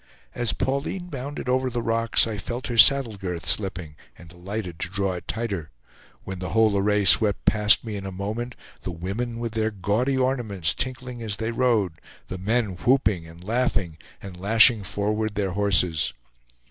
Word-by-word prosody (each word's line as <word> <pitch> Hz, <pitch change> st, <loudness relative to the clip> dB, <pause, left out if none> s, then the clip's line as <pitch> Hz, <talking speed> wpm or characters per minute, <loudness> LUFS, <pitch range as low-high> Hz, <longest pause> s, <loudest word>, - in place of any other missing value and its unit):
As 120 Hz, -2 st, 0 dB
Pauline 140 Hz, +7 st, -3 dB
bounded 140 Hz, -1 st, -6 dB
over 130 Hz, +1 st, +1 dB
the 120 Hz, -1 st, -3 dB
rocks 115 Hz, 0 st, +2 dB
I 110 Hz, -3 st, -4 dB
felt 120 Hz, +4 st, -5 dB
her 120 Hz, -, -3 dB
saddle 125 Hz, -3 st, +6 dB
girth 90 Hz, -4 st, -5 dB
slipping, 90 Hz, -6 st, -1 dB, 0.2 s
and 85 Hz, -, -14 dB
alighted 90 Hz, 0 st, -6 dB
to 85 Hz, -, -3 dB
draw 100 Hz, 0 st, -1 dB
it 90 Hz, -, -8 dB
tighter; 100 Hz, -9 st, -4 dB, 0.5 s
when 95 Hz, -1 st, -7 dB
the 90 Hz, -1 st, -5 dB
whole 110 Hz, -2 st, +4 dB
array 105 Hz, +1 st, +1 dB
swept 100 Hz, +3 st, +7 dB
past 105 Hz, -1 st, +4 dB
me 110 Hz, -3 st, -5 dB
in 95 Hz, -, -7 dB
a -, -, -5 dB
moment, 110 Hz, +6 st, -5 dB, 0.3 s
the -, -, -5 dB
women 100 Hz, +8 st, -4 dB
with 115 Hz, -1 st, -4 dB
their 110 Hz, 0 st, 0 dB
gaudy 110 Hz, +7 st, -1 dB
ornaments 120 Hz, -10 st, 0 dB
tinkling 125 Hz, -1 st, -5 dB
as 110 Hz, -3 st, -3 dB
they 110 Hz, +1 st, -3 dB
rode, 115 Hz, -9 st, 0 dB, 0.3 s
the 95 Hz, -, -6 dB
men 105 Hz, -1 st, -1 dB
whooping, 105 Hz, -8 st, +1 dB
and 85 Hz, +2 st, -14 dB
laughing, 100 Hz, -7 st, -1 dB, 0.2 s
and 95 Hz, -3 st, -9 dB
lashing 115 Hz, +2 st, +5 dB
forward 105 Hz, +2 st, -2 dB
their 100 Hz, -2 st, -1 dB
horses. 90 Hz, -5 st, +1 dB
105 Hz, 170 wpm, -24 LUFS, 95-120 Hz, 0.5 s, swept